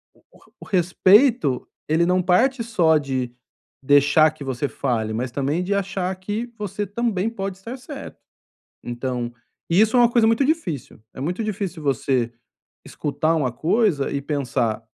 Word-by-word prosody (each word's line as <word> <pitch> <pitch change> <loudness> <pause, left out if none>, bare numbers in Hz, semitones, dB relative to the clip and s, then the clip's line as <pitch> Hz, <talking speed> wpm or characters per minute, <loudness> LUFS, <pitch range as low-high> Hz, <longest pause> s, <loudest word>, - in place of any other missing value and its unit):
o - - -26
o - - -19
re - - -24
o - - -9
respeito, 185 - +3 0.2
ele 160 +2 +3
não 180 +1 +2
parte 230 +8 +2
só 175 -9 +3
de 130 -4 -3 0.5
deixar 145 +3 +5
que 155 -2 -10
você 135 +1 -2
fale, 115 -6 -2
mas 120 +3 -3
também 145 +7 -1
de 195 +3 -1
achar 195 -1 -1
que 210 +6 -4
você 205 -1 -3
também 215 -1 -1
pode 195 -4 -5
estar 230 +7 -8
certo. 275 +2 -9 0.7
Então, 120 0 -3 0.4
isso 215 +7 +4
é - - +6
uma 240 - +6
coisa 235 -2 +4
muito 230 +5 +3
difícil, 265 - -2
é - - -8
muito 180 +10 -2
difícil 195 -5 -4
você 130 -3 0 0.5
escutar 155 +3 -1
uma 140 -5 0
coisa 160 - +1
e 140 - -2
pensar: 125 -6 -1
170 Hz, 160 wpm, -22 LUFS, 135-210 Hz, 0.7 s, é